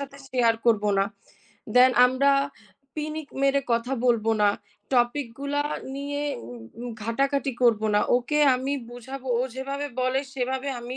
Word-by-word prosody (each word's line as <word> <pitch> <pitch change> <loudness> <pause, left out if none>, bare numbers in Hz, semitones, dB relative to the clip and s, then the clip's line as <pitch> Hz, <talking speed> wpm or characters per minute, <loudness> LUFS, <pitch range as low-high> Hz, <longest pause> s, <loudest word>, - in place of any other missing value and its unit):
সাথে 280 0 -7
share 235 -3 +2
করবো 210 -2 +3
না। 195 - +4 0.7
Then 255 +1 +7 0.2
আমরা 265 +2 +2 0.7
পিনিক 305 0 -4
মেরে 275 0 +3
কথা 235 +3 0
বলবো 225 -2 +3
না, 205 - +6 0.5
Topic 240 +2 +2
গুলা 285 +1 0 0.3
নিয়ে 285 +1 -3 0.3
উ - - -8 0.3
উ - - -5 0.2
ঘাটাঘাটি 275 +4 0
করবো 220 -3 +4
না। 210 - +4 0.2
ওকে 275 +5 -1 0.2
আমি 265 +2 -2 0.2
বুঝাবো, 260 +2 -8
ও - - +2
যেভাবে 275 +2 -4
বলে 255 +1 +1
সেভাবে 260 +1 -2
আমি 245 +2 -6
260 Hz, 150 wpm, -25 LUFS, 240-280 Hz, 0.7 s, Then